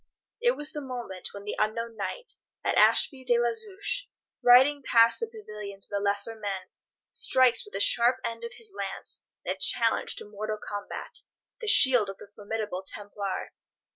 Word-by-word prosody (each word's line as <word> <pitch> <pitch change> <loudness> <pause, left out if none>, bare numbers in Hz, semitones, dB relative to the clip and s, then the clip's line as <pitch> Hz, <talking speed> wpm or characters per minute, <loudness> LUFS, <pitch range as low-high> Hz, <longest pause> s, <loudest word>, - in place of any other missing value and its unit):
It 485 0 +2
was 295 +1 +1
the 300 - -6
moment 245 -8 -5
when 200 - -10
the 210 - -4
unknown 230 +2 -2
knight, 210 - -6 0.3
at - - 0
Ashby 270 -4 +4
de 240 -2 +2
la 235 0 +1
Zouch, 410 - -4 0.3
riding 265 +4 +6
past 230 -3 +4
the 460 - -3
pavilions 210 - -7
of - - -13
the 200 - -1
lesser 200 +2 +1
men, 200 -3 -6 0.4
strikes 255 -3 +3
with 210 - -16
the 195 - -3
sharp 235 +4 +3
end 230 0 -5
of 235 - -6
his 440 -3 -9
lance, - - -5 0.2
in - - 0
a - - -15
challenge - - +4
to - - -8
mortal 215 +1 -5
combat, 205 -1 -7 0.4
the 450 - -6
shield 255 - +7
of 195 - -7
the 200 - -14
formidable 210 -2 -4
Templar. 200 0 -6
230 Hz, 175 wpm, -27 LUFS, 205-265 Hz, 0.4 s, shield